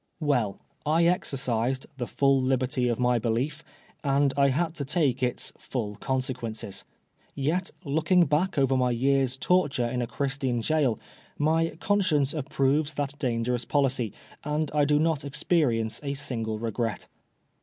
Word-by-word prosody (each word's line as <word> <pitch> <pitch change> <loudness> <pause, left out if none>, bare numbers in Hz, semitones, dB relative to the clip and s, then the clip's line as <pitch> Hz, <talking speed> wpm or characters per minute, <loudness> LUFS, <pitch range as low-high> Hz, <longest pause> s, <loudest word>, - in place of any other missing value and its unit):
Well, 125 - 0 0.2
I 160 +3 +3
exercised 130 -7 0
" - - -36
the 120 - -2
full 135 -1 +3
liberty 130 -1 +1
of 120 -2 0
my 125 -1 +3
belief," 125 +7 -1 0.4
and 140 -1 +2
I 140 -1 +4
had 160 +4 0
to 145 - -2
take 140 -3 +1
its 125 -1 -2
*^ - - -30
full 105 -5 -4
conseqneiices." 125 -6 -3 0.5
Yet, 165 +7 0 0.2
looking 160 +5 +3
back 155 +4 0
over 135 -1 +3
my 125 -1 +2
year's 130 +1 +1
torture 145 -7 +2
in 125 +1 -2
a 120 - -2
Christian 135 -2 -1
gaol, 135 -3 +1 0.4
my 160 +2 +2
•conBcience 180 -9 +2
approves 145 +1 0
that 145 0 -3
dangerous 120 -2 0
policy, 130 -4 +1 0.3
and 150 0 -1
I 150 -1 +3
do 145 0 +3
not 155 -1 +1
experience 135 -6 +1
a 140 -1 -3
single 115 -6 -2
regret. 115 -2 -3
135 Hz, 150 wpm, -27 LUFS, 125-150 Hz, 0.5 s, I